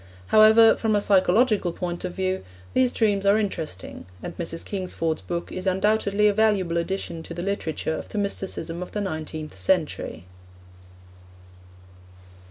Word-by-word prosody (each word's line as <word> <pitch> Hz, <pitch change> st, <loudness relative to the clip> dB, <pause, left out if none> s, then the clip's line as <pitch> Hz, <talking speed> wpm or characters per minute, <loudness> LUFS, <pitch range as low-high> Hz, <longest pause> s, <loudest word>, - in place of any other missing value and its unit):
However, 220 Hz, +1 st, +7 dB
from 220 Hz, -2 st, 0 dB
a -, -, +3 dB
psychological 200 Hz, 0 st, +3 dB
point 175 Hz, 0 st, -5 dB
of 180 Hz, -1 st, -4 dB
view, 190 Hz, 0 st, -1 dB, 0.3 s
these 255 Hz, -1 st, +3 dB
dreams 205 Hz, -5 st, +1 dB
are 200 Hz, +1 st, +4 dB
interesting, 160 Hz, -, -4 dB, 0.2 s
and 175 Hz, -, -6 dB
Mrs. 165 Hz, -1 st, -3 dB
Kingsford's 180 Hz, -5 st, -2 dB
book 170 Hz, -1 st, -4 dB
is 185 Hz, +1 st, -4 dB
undoubtedly 205 Hz, +2 st, +2 dB
a 205 Hz, -, +3 dB
valuable 200 Hz, -5 st, +2 dB
addition 170 Hz, -1 st, -3 dB
to 170 Hz, -, -9 dB
the 175 Hz, -, -4 dB
literature 160 Hz, -5 st, -2 dB
of -, -, -10 dB
the -, -, -6 dB
mysticism 190 Hz, -4 st, -3 dB
of 180 Hz, -, -7 dB
the 210 Hz, -, -2 dB
nineteenth 155 Hz, -, -5 dB
century. 95 Hz, -2 st, -1 dB
190 Hz, 145 wpm, -24 LUFS, 170-210 Hz, 0.3 s, However